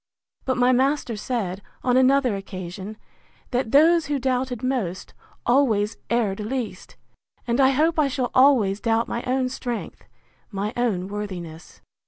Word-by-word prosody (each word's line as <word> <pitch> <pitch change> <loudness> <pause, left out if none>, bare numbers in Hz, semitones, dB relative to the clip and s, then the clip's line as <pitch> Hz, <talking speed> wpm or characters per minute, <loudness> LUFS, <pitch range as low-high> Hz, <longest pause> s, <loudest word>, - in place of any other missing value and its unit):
But 260 -1 0
my 250 0 +4
master 265 -1 +1
said, 205 -4 -3 0.2
on 250 -1 +2
another 260 -3 +4
occasion, 195 +1 -7 0.5
That 245 -2 -1
those 325 +3 +5
who 290 -1 0
doubted 255 -2 -1
most, 220 -9 -2 0.3
always 230 -5 +2
erred 220 -5 0
least; 235 +2 -5 0.5
and 240 +2 +1
I 265 - +6
hope 315 +4 +2
I 295 - +4
shall 260 -2 -2
always 245 -7 +4
doubt 230 0 +1
my 235 - -3
own 255 0 +1
strength, 245 -2 -5 0.4
my 205 +1 -3
own 210 -7 0
worthiness. 180 -6 -7
245 Hz, 140 wpm, -23 LUFS, 205-265 Hz, 0.5 s, I